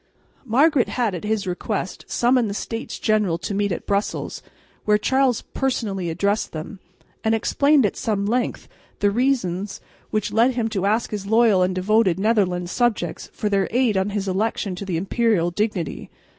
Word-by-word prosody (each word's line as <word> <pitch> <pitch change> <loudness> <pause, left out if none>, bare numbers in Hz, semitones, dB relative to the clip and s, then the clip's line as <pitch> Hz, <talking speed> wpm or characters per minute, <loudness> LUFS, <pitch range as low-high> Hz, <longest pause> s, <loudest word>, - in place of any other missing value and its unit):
Margaret 270 +2 +3
had 235 -5 0
at 175 - -5
his 215 -1 -1
request 185 +1 -3
summoned 240 -2 +2
the 200 - -4
States 225 +1 -5
General 210 -6 +1
to 185 - -4
meet 200 0 0
at 170 - -4
Brussels, 200 +1 -2 0.4
where 210 0 +4
Charles 260 +2 +1
personally 215 -9 -1
addressed 200 +6 -1
them, 160 +5 -7 0.4
and 220 0 +2
explained 280 +4 +3
at 205 - -1
some 205 -3 -1
length 240 +4 -1 0.3
the 205 0 +2
reasons 210 -6 0 0.3
which 215 -2 -2
led 235 +3 +3
him 230 -2 0
to 200 -3 -1
ask 220 +3 0
his 205 -2 -4
loyal 220 -3 +4
and 180 0 +1
devoted 190 -1 +2
Netherland 195 -5 +1
subjects 215 -9 -1
for 210 - -3
their 195 -2 +1
aid 245 -3 +2
on 190 +1 +1
his 200 -1 -3
election 195 0 -1
to 200 - -5
the 180 -4 -2
imperial 195 -1 +1
dignity. 200 -4 -2
210 Hz, 170 wpm, -22 LUFS, 190-230 Hz, 0.4 s, where